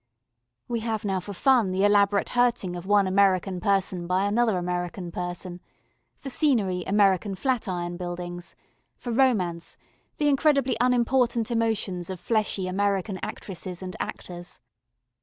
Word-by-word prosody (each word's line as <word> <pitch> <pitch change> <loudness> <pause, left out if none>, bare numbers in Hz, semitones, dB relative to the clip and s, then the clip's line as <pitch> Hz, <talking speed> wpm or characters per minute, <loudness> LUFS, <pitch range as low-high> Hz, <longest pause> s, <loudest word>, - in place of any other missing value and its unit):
We 235 -1 -1
have 220 -1 -3
now 190 -2 0
for 185 +3 -8
fun 240 0 +3
the 190 +2 +1
elaborate 205 -1 +3
hurting 245 -7 +1
of 175 +1 -7
one 205 -1 +4
American 190 -1 +2
person 190 -2 0
by 185 +2 +1
another 220 0 +2
American 175 0 -3
person; 175 0 -5 0.6
for - - -10
scenery, 210 - +1
American 195 0 +2
flat 255 +2 -1
iron 175 -1 -3
buildings; 175 0 -6 0.4
for 240 - -5
romance 210 -10 +1 0.4
the 295 - +1
incredibly 275 -3 +3
unimportant 245 -1 +2
emotions 215 -6 -1
of 185 -2 -5
fleshy 210 -3 0
American 195 0 -1
actresses 185 -1 -6
and 185 0 -6
actors. 175 0 -6
195 Hz, 135 wpm, -26 LUFS, 180-230 Hz, 0.6 s, one